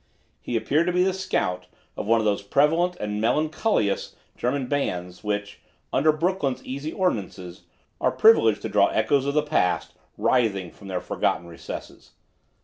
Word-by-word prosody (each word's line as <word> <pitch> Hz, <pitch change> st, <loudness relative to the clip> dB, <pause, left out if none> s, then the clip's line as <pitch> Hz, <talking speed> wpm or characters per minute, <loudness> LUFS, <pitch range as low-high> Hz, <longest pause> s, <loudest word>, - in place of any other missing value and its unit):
He 120 Hz, -, -4 dB
appeared 155 Hz, +9 st, +1 dB
to -, -, +2 dB
be 180 Hz, +1 st, +3 dB
the 190 Hz, 0 st, +1 dB
"scout" 90 Hz, -, -2 dB, 0.3 s
of -, -, -5 dB
one 115 Hz, +1 st, +4 dB
of 110 Hz, -, -1 dB
those 105 Hz, -1 st, +1 dB
prevalent 160 Hz, -, +2 dB
and 105 Hz, 0 st, -3 dB
melancholious 155 Hz, -, 0 dB, 0.2 s
German 130 Hz, +2 st, -1 dB
bands, 90 Hz, -10 st, -3 dB
which, 105 Hz, -1 st, -3 dB, 0.3 s
under 155 Hz, +4 st, +4 dB
Brooklyn's 155 Hz, -4 st, -1 dB
easy 140 Hz, +4 st, -4 dB
ordinances, 95 Hz, -, -3 dB, 0.4 s
are -, -, +3 dB
privileged 450 Hz, +1 st, +5 dB
to -, -, -3 dB
draw -, -, +4 dB
echoes 140 Hz, -2 st, +1 dB
of 140 Hz, -, -1 dB
the 150 Hz, -, +3 dB
past 150 Hz, -12 st, 0 dB, 0.2 s
writhing 100 Hz, -8 st, +1 dB
from 100 Hz, -, -14 dB
their 95 Hz, -2 st, -3 dB
forgotten 85 Hz, -, -1 dB
recesses. 85 Hz, -1 st, -9 dB
130 Hz, 155 wpm, -25 LUFS, 100-155 Hz, 0.4 s, privileged